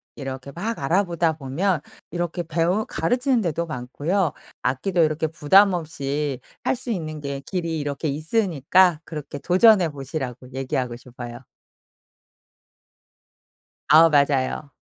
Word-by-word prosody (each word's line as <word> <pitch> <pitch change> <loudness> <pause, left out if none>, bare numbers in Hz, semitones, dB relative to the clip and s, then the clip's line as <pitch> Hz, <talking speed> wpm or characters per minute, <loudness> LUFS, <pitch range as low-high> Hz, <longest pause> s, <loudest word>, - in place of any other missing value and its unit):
이렇게 135 0 -6
막 215 +8 -3
알아보다 170 +1 +1
보면 155 +6 0 0.3
이렇게 175 +1 -2
배우 170 +6 0
가르치는 245 - +1
데도 170 -2 -1
많고요. 155 +6 -1 0.3
악기도 165 +8 0
이렇게 155 0 +1
부담 185 +6 +5
없이 145 -4 -2 0.2
할 - - +1
수 250 -1 -4
있는 155 -6 -4
게 140 -1 -4
길이 165 +2 -3
이렇게 145 +1 -3
있으니까 165 - +2
그렇게 150 -2 -7
"도전해 185 +1 +5
보시라."고 135 -3 -6
얘기하고 130 -2 -2
싶어요. 120 -1 -9 2.5
아 165 +2 +8
맞아요. 140 -1 +1
155 Hz, 280 characters per minute, -23 LUFS, 140-180 Hz, 2.5 s, 아